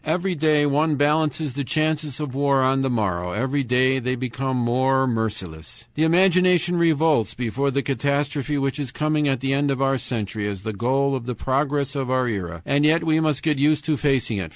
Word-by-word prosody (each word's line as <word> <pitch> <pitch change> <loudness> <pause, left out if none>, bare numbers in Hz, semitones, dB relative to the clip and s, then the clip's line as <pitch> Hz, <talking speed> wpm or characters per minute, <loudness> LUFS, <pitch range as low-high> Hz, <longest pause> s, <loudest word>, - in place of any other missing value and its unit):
Every 180 +4 0
day 155 -2 +2
one 150 +2 +1
balances 150 0 0
the 140 +2 -3
chances 155 -1 -1
of 150 -4 -4
war 140 -1 +2
on 135 +1 +2
the 135 - 0
morrow, 90 -7 -1
every 135 +6 -1
day 130 +2 +2
they 125 +1 -2
become 130 +1 -3
more 130 +2 +1
merciless. 110 -5 -4
"The 155 - -3
imagination 180 0 +3
revolts 160 - +2
before 125 +3 -1
the 140 +1 -1
catastrophe 145 +1 -1
which 135 +1 -2
is 135 -4 -4
coming 150 +1 0
at 135 -3 0
the 135 0 0
end 140 +1 +1
of 135 -2 -1
our 135 -1 +1
century 105 -4 -4
as 100 -2 -5
the 110 0 -4
goal 135 +6 0
of 125 -2 -6
the 125 - -3
progress 140 +3 -1
of 135 -3 -3
our 130 -1 +1
era, 90 -6 -4
and 140 +1 +1
yet 160 +3 +3
we 160 -1 +2
must 155 -3 0
get 150 -3 0
used 150 +1 +2
to 155 -1 +1
facing 135 -6 0
it. 90 -4 -5
135 Hz, 205 wpm, -22 LUFS, 125-150 Hz, -, imagination